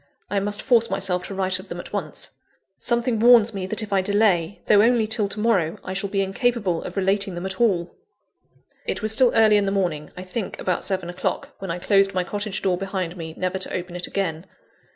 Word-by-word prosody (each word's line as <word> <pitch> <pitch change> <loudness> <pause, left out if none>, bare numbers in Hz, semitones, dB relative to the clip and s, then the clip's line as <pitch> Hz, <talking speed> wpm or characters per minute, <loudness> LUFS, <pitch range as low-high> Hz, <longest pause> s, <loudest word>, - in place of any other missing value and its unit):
I 200 - +2
must 205 +1 -2
force 230 -3 +3
myself 180 -2 -1
to 195 - -6
write 190 -1 0
of 190 - -11
them 175 - -5
at - - -10
once. - - -4 0.5
Something 235 -1 0
warns 230 -1 +6
me 190 -2 -4
that 215 +3 0
if 210 -1 -5
I 195 - +4
delay, 200 -3 +1
though 205 -1 +6
only 230 0 +4
till 215 -2 0
to 210 - -5
morrow, 195 -8 +1
I 185 - -5
shall 195 +1 -2
be 195 0 0
incapable 195 -3 0
of - - -8
relating 195 0 +1
them 175 +2 -5
at 190 +3 -4
all. 180 -7 +1 0.9
It - - -2
was 215 - 0
still 245 +2 +4
early 215 -2 +6
in 205 - +2
the - - +1
morning 175 -6 -1
I 180 - -6
think 185 +3 -5
about 180 - -1
seven 190 -3 -1
o'clock 175 - -3
when 195 - -6
I 170 - -2
closed 195 +1 +2
my 185 - +1
cottage 205 +1 -4
door 185 -2 +1
behind 190 -3 -3
me, 160 -2 -7
never 185 +1 -2
to 185 - -4
open 180 -1 -5
it 175 - -3
again. 180 -3 -3
195 Hz, 225 wpm, -23 LUFS, 180-215 Hz, 0.9 s, warns